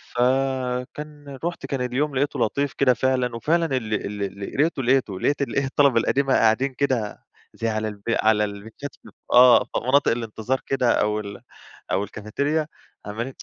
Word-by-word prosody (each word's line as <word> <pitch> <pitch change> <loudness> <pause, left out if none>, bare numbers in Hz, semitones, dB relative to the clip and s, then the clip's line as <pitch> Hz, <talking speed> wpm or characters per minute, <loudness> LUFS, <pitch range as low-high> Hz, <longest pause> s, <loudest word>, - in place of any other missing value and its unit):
فكان 135 +3 -1
رُحت، 175 - -3
كان 135 -3 -3
اليوم 135 +3 -1
لقيته 140 +2 0
لطيف 140 +4 0
كده 130 -2 +3
فعلًا، 125 -2 0
وفعلًا 165 +9 +1
ال 110 -3 -4 0.3
ال 100 0 -6
لقيته، 150 -3 0 0.4
لقيت 145 +6 0
الإيه 140 0 0
الطلبة 135 -3 +3
القديمة 135 +3 +1
قاعدين 125 +5 +3
كده 125 -6 -1 0.3
زي 115 - -1
على 110 0 -1
الب 100 -1 -8
على 110 -2 +3
البنشات. 110 +7 -8 0.4
آه، 125 0 +8
في - - -22 0.2
مناطق 140 +2 +4
الانتظار 115 +2 -2
كده، 130 -3 +2
أو 105 0 +1
ال 100 -1 -8 0.5
أو 100 +2 +1
الcafetaria، 140 +10 -2 0.4
عمّالين 115 +6 -4
125 Hz, 150 wpm, -23 LUFS, 110-140 Hz, 0.5 s, آه